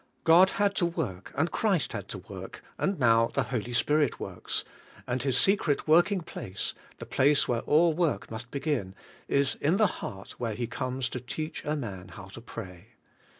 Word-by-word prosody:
God 175 Hz, +3 st, +7 dB
had 200 Hz, 0 st, +3 dB
to 175 Hz, -, +3 dB
work 125 Hz, -, -4 dB
and 160 Hz, +4 st, +1 dB
Christ 195 Hz, -9 st, +1 dB
had -, -, -5 dB
to -, -, -5 dB
work, -, -, -9 dB, 0.2 s
and 195 Hz, -1 st, 0 dB
now 115 Hz, -2 st, +4 dB
the -, -, -1 dB
Holy 120 Hz, -2 st, -3 dB
Spirit 145 Hz, +3 st, +2 dB
works, -, -, -3 dB, 0.4 s
and 125 Hz, +1 st, -1 dB
His 135 Hz, -1 st, +2 dB
secret 180 Hz, -7 st, +3 dB
working 175 Hz, +5 st, +4 dB
place, 95 Hz, -, -5 dB, 0.2 s
the -, -, -8 dB
place 145 Hz, +2 st, +3 dB
where 120 Hz, -2 st, +1 dB
all 160 Hz, +2 st, +4 dB
work 165 Hz, -6 st, 0 dB
must 115 Hz, +2 st, -6 dB
be 140 Hz, -, -4 dB
gin, 125 Hz, -12 st, -1 dB, 0.3 s
is 140 Hz, 0 st, +2 dB
in 160 Hz, +6 st, +3 dB
the 215 Hz, -, +5 dB, 0.2 s
heart 95 Hz, -1 st, -7 dB
v/here 115 Hz, -3 st, -2 dB
He 120 Hz, -, -2 dB
comes 130 Hz, +1 st, -2 dB
to 125 Hz, -, -4 dB
teach 155 Hz, +6 st, -5 dB
a 150 Hz, -, 0 dB
man 100 Hz, -10 st, -5 dB
how 95 Hz, +2 st, -10 dB
to 115 Hz, -, -10 dB
pray. 95 Hz, -5 st, -9 dB
135 Hz, 190 wpm, -28 LUFS, 115-160 Hz, 0.4 s, God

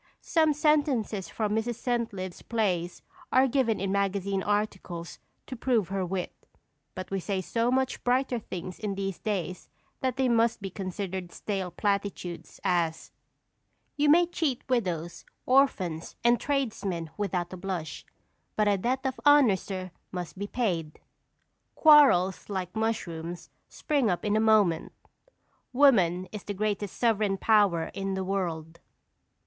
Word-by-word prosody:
Some 315 Hz, -2 st, +3 dB
sentences 280 Hz, -, +1 dB
from 210 Hz, -2 st, -2 dB
Mrs. 225 Hz, +2 st, -1 dB
Centlivre's 225 Hz, -7 st, -3 dB
plays 185 Hz, -7 st, -1 dB, 0.3 s
are 260 Hz, +1 st, +5 dB
given 245 Hz, -4 st, +1 dB
in 195 Hz, +1 st, -1 dB
magazine 200 Hz, 0 st, 0 dB
articles 190 Hz, -5 st, -3 dB, 0.3 s
to 260 Hz, -, -7 dB
prove 230 Hz, -6 st, +1 dB
her 195 Hz, -1 st, -1 dB
wit, 180 Hz, 0 st, -3 dB, 0.6 s
but 185 Hz, 0 st, -7 dB
we 195 Hz, -, 0 dB
say 195 Hz, +1 st, -2 dB
so 230 Hz, +5 st, 0 dB
much 260 Hz, +1 st, 0 dB
brighter 250 Hz, 0 st, +1 dB
things 185 Hz, -3 st, -7 dB
in 205 Hz, -2 st, -3 dB
these 195 Hz, -1 st, -3 dB
days 185 Hz, -4 st, -3 dB, 0.3 s
that 260 Hz, -2 st, -1 dB
they 265 Hz, -1 st, +2 dB
must 230 Hz, -1 st, +2 dB
be 195 Hz, -2 st, -6 dB
considered 185 Hz, -1 st, -5 dB
stale 195 Hz, -3 st, -3 dB
platitudes, 200 Hz, -2 st, -3 dB
as: 175 Hz, -4 st, 0 dB, 0.8 s
"You 295 Hz, 0 st, +2 dB
may 345 Hz, +4 st, +6 dB
cheat 320 Hz, -7 st, -2 dB
widows, 175 Hz, -, -1 dB, 0.2 s
orphans, 190 Hz, -, +2 dB
and 240 Hz, 0 st, +4 dB
tradesmen 205 Hz, -, -2 dB
without 185 Hz, -4 st, -2 dB
a -, -, -6 dB
blush, 180 Hz, -4 st, -5 dB, 0.5 s
but 215 Hz, -1 st, +2 dB
a 200 Hz, -1 st, +2 dB
debt 250 Hz, +6 st, 0 dB
of 260 Hz, -1 st, -2 dB
honor, 290 Hz, -8 st, +6 dB
sir, 185 Hz, -1 st, -6 dB, 0.2 s
must 180 Hz, -2 st, -5 dB
be 200 Hz, +2 st, -4 dB
paid." 175 Hz, -11 st, -2 dB, 0.8 s
"Quarrels, 275 Hz, -, +5 dB
like 185 Hz, -1 st, -4 dB
mushrooms, 175 Hz, -7 st, -3 dB, 0.2 s
spring 280 Hz, -7 st, 0 dB
up 180 Hz, +2 st, -1 dB
in 210 Hz, 0 st, +1 dB
a -, -, +3 dB
moment." 215 Hz, -7 st, +3 dB, 0.8 s
"Woman 190 Hz, -10 st, +4 dB
is 210 Hz, -3 st, -7 dB
the 205 Hz, -, -5 dB
greatest 205 Hz, 0 st, -2 dB
sovereign 215 Hz, -4 st, +2 dB
power 200 Hz, -7 st, +3 dB
in 195 Hz, -1 st, -3 dB
the 190 Hz, -, -2 dB
world." 170 Hz, -4 st, -3 dB
200 Hz, 140 wpm, -28 LUFS, 185-235 Hz, 0.8 s, may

